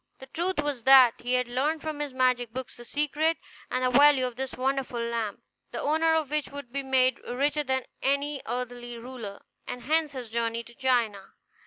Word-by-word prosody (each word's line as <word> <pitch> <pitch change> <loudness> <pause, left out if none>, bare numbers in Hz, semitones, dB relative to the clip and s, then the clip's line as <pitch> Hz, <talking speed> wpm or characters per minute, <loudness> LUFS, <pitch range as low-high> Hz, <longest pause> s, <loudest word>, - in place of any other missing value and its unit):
The 265 - -11
truth 340 +3 -1
was 280 -6 -3
that 260 -3 +7
he 245 +1 0
had 250 -1 +1
learned 285 +6 -1
from 310 -2 -4
his 295 -2 -3
magic 250 -2 +1
books 260 +2 -6
the 240 - -11
secret 300 +5 0 0.3
and 255 0 0
the 255 - +2
value 285 -2 +6
of 250 -2 -4
this 265 +1 -4
wonderful 260 -1 -1
lamp, 235 -3 -3 0.3
the - - -5
owner 320 +2 +2
of 310 -3 -1
which 300 -1 0
would 280 -4 -9
be 275 - -1
made 260 -2 +2
richer 285 +4 -1
than 260 -1 -1 0.2
any 280 +1 0
earthly 245 -1 -4
ruler, 230 -4 -8 0.2
and 245 -1 -6
hence 310 0 +1
his 245 -4 -7
journey 230 0 -1
to 235 - -15
China. 235 -6 0
260 Hz, 195 wpm, -27 LUFS, 240-290 Hz, 0.3 s, that